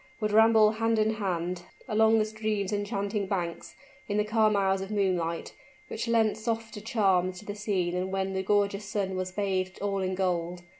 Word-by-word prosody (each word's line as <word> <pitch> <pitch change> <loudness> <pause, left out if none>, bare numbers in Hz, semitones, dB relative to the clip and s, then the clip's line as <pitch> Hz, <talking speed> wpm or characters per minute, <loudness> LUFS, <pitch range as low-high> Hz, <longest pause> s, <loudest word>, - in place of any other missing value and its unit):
would 215 -1 -1
ramble 220 0 +6
hand 225 +1 0
in 215 0 +3
hand, 180 -4 -2 0.3
along 220 0 +4
the 215 - +2
stream's 215 -2 -2
enchanting 205 -1 -2
banks, 175 -4 -3 0.3
in 205 - 0
the 210 - +3
calm 215 0 +2
hours 195 -1 +2
of 195 - -5
moonlight, 180 -5 -1 0.4
which - - -4
lent 225 -2 +3
softer 225 -1 -3
charms 190 -5 +1
to 210 - -11
the 205 - -4
scene 200 -4 -1
than 180 +1 -2
when 195 0 -2
the 190 - -1
gorgeous 200 +1 +1
sun 195 -3 -2
was 185 0 -3
bathed 190 -1 -2
all 200 -1 -1
in 185 0 -1
gold. 175 -2 -1
200 Hz, 185 wpm, -28 LUFS, 185-215 Hz, 0.4 s, ramble